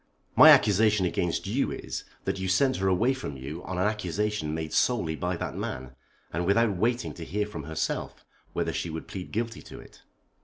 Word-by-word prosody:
My - - +10
accusation 105 -1 +5
against 85 -1 -1
you - - 0
is, - - -5 0.2
that - - -1
you 95 - -2
sent 130 +8 +3
her 95 - 0
away 110 +8 +3
from 125 - -6
you 75 +7 -7
on 95 - -4
an 90 - +2
accusation 105 -4 -1
made 80 -1 -4
solely 105 -11 +2
by 90 +2 -2
that - - -4
man, 65 0 -5 0.4
and 85 +2 -1
without 105 +1 +3
waiting 120 +6 0
to 85 - -8
hear 105 +5 -1
from 85 -8 -7
herself 80 +1 -3 0.3
whether - - -1
she 85 - -2
would 80 0 -6
plead 95 -2 -7
guilty 115 +1 -3
to - - -11
it." - - -15
95 Hz, 195 wpm, -27 LUFS, 80-105 Hz, 0.4 s, My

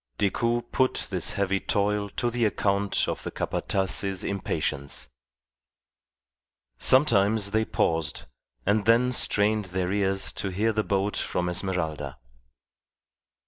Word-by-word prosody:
Decoud 120 +4 0
put 130 -1 +1
this - - 0
heavy 100 -1 0
toil 105 +1 0
to 120 - 0
the 120 0 -1
account 100 -2 +1
of - - -3
the - - -5
Capataz's 95 0 -1
impatience. 70 -10 -2 1.7
Sometimes 110 -6 +4
they 110 +1 +1
paused, 80 -7 -1 0.4
and 100 +1 +2
then 120 +2 +4
strained 105 -3 +2
their 90 0 -2
ears 95 -1 0
to 100 - -4
hear 105 +4 0
the 110 0 0
boat 100 +1 0
from 90 0 -1
Esmeralda. 80 -6 -2
100 Hz, 115 wpm, -26 LUFS, 95-110 Hz, 1.7 s, Sometimes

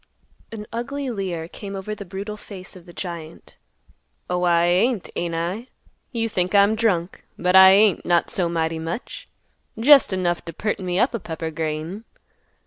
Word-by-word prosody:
An 215 -2 -7
ugly 270 +3 -3
leer 180 -6 -4
came 195 +3 -8
over 195 +2 -5
the 205 -1 -8
brutal 200 +4 -6
face 195 -2 -11
of 180 -1 -14
the - - -11
giant; 170 -3 -8 0.8
"Oh, 180 0 0
I 170 -1 +3
ain't, 190 +4 +1
ain't 170 -1 -2
I? 180 +9 -3 0.4
You 230 -2 -1
think 185 -2 -1
I'm 200 +1 +6
drunk. 195 -6 0
But 180 +1 +1
I 190 0 +10
ain't, 200 -1 +4
not 175 -1 +1
so 175 -3 0
mighty 165 -1 -1
much. 165 +8 -6 0.5
Jest 275 +1 +7
enough 180 -2 -1
t' 165 - -8
perten 195 0 -3
me 180 0 -1
up 245 +6 +2
a 230 - -2
pepper 160 -2 -5
grain." 160 +6 -4
185 Hz, 170 wpm, -23 LUFS, 170-210 Hz, 0.8 s, I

